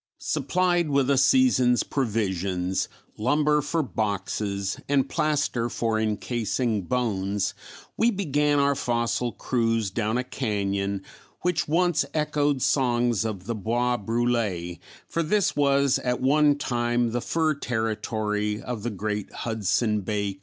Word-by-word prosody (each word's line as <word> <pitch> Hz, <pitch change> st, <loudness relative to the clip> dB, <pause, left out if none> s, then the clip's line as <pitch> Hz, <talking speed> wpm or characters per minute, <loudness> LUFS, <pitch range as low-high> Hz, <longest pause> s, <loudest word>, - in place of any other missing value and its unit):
Supplied 175 Hz, +3 st, 0 dB
with 140 Hz, -1 st, +2 dB
a 140 Hz, -, +3 dB
season's 135 Hz, -, +4 dB
provisions, 95 Hz, -, -1 dB, 0.3 s
lumber 150 Hz, +5 st, +2 dB
for 160 Hz, +3 st, -1 dB
boxes, 100 Hz, -3 st, -2 dB
and 140 Hz, -2 st, +2 dB
plaster 145 Hz, -6 st, 0 dB
for 115 Hz, -2 st, -1 dB
encasing 110 Hz, +1 st, -1 dB
bones, 100 Hz, -5 st, -1 dB, 0.4 s
we 230 Hz, -, +4 dB
began 150 Hz, -, +1 dB
our 140 Hz, 0 st, +3 dB
fossil 120 Hz, -1 st, -1 dB
cruise 115 Hz, -5 st, 0 dB
down 110 Hz, +2 st, -1 dB
a 125 Hz, -, 0 dB
cañon 100 Hz, -5 st, -2 dB, 0.4 s
which 175 Hz, -1 st, 0 dB
once 175 Hz, +1 st, +2 dB
echoed 145 Hz, -3 st, +1 dB
songs 120 Hz, -4 st, +2 dB
of 100 Hz, -4 st, -4 dB
the 115 Hz, -, -2 dB
Bois 120 Hz, +3 st, 0 dB
brulé, 110 Hz, -6 st, -1 dB, 0.3 s
for 170 Hz, -, -1 dB
this 195 Hz, +4 st, +1 dB
was 140 Hz, -1 st, +3 dB
at 125 Hz, -1 st, -1 dB
one 145 Hz, +2 st, +4 dB
time 120 Hz, -3 st, 0 dB
the 120 Hz, +1 st, -1 dB
fur 160 Hz, +2 st, +1 dB
territory 110 Hz, -4 st, -2 dB
of 120 Hz, -3 st, -5 dB
the 120 Hz, -, -2 dB
great 105 Hz, 0 st, -3 dB
Hudson 110 Hz, -1 st, 0 dB
Bay 100 Hz, 0 st, -2 dB
Company. 95 Hz, -, -22 dB
120 Hz, 130 wpm, -25 LUFS, 105-140 Hz, 0.4 s, season's